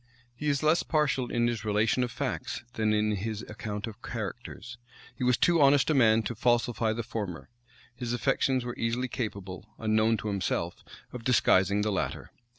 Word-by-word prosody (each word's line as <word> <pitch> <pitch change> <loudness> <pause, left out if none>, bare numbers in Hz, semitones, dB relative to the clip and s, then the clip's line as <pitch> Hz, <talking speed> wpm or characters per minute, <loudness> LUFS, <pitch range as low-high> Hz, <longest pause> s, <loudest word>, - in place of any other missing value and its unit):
He 150 - -4
is 140 +1 0
less 155 +2 +4
partial 140 -5 0
in 120 0 +1
his 120 -3 -1
relation 110 +4 +2
of 125 - -2
facts, 120 - -4
than 110 -1 +1
in 105 0 +1
his 110 +2 -4
account 105 -1 -5
of 115 0 -9
characters: 120 +2 -6 0.4
he - - -4
was 125 -1 +3
too 170 -3 +3
honest 140 +2 +5
a - - +3
man 115 -5 +4
to 120 - -3
falsify 120 -1 +1
the 115 +1 -3
former; 105 -7 -5 0.5
his 120 -1 -4
affections 130 0 +1
were 120 - -4
easily 120 +3 0
capable, 100 -5 -5
unknown 110 +1 +2
to 110 - -5
himself, 100 -4 -2 0.3
of 125 -2 -7
disguising 105 -4 +3
the 105 - 0
latter. 95 - -3
115 Hz, 175 wpm, -29 LUFS, 105-125 Hz, 0.5 s, honest